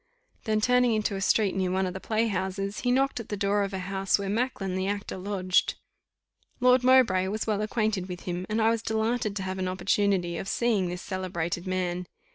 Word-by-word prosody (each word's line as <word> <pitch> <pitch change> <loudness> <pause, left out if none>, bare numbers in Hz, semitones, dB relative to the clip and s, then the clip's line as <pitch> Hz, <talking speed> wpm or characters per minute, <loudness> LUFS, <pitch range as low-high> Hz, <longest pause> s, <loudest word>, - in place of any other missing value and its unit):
Then 215 -1 +1
turning 250 0 +3
into 210 -1 -1
a 195 - -4
street 200 0 +2
near 190 -1 0
one 190 +1 +1
of 180 - -3
the 190 - -5
play 220 +3 0
houses, 195 -1 -2
he 245 - -1
knocked 270 0 +1
at 230 - -8
the 205 - -3
door 200 +1 +1
of 200 0 -1
a 190 - -3
house 195 +1 0
where 200 -1 -4
Macklin 210 -4 -1
the 190 0 -1
actor 205 0 -3
lodged. 185 -1 0 0.8
Lord 250 0 +5
Mowbray 250 -8 +5
was 215 +3 -2
well 210 -2 0
acquainted 215 -4 -1
with 180 -1 -6
him, 180 +1 -4
and 215 +1 0
I 225 0 +4
was 230 -1 -1
delighted 220 -1 -1
to 195 - -3
have 190 0 -4
an 185 - -1
opportunity 185 -1 +1
of 195 - -5
seeing 215 -4 +1
this 175 0 -5
celebrated 180 -2 -3
man. 180 -1 -2
195 Hz, 215 wpm, -27 LUFS, 185-220 Hz, 0.8 s, Lord